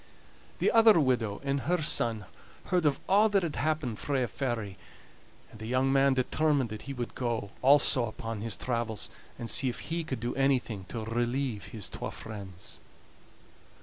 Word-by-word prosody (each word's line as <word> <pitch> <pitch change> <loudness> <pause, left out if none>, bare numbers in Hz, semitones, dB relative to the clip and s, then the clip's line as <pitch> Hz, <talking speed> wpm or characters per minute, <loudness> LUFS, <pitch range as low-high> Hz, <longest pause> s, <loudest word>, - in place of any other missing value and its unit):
The - - +2
other 225 -5 +7
widow 120 -7 +1
and 140 0 0
her 170 +4 0
son 115 -7 +1 0.4
heard 180 -4 +2
of 140 - +1
a' 210 +3 +5
that 195 -2 +3
had 165 -3 -3
happened 155 -7 -1
frae 135 -3 0
a - - -1
fairy, 110 -6 -3 0.7
and 110 - -13
the 110 - -6
young 130 +2 +2
man 135 0 +4
determined 135 -1 +1
that 110 - -6
he - - -3
would 120 -2 -4 0.5
also 135 -1 +6
go 120 - 0
upon 115 -1 -6
his 115 -1 -2
travels, 115 -6 -2 0.3
and 115 - -5
see 130 +3 +2
if 125 - -7
he 170 0 -1
could 130 -6 -4
do 120 +2 -2
anything 125 -7 0
to 110 +1 -5
relieve 120 0 -1
his 110 -5 -5
twa - - -5
friends. 100 -5 -9
125 Hz, 175 wpm, -29 LUFS, 110-140 Hz, 0.7 s, other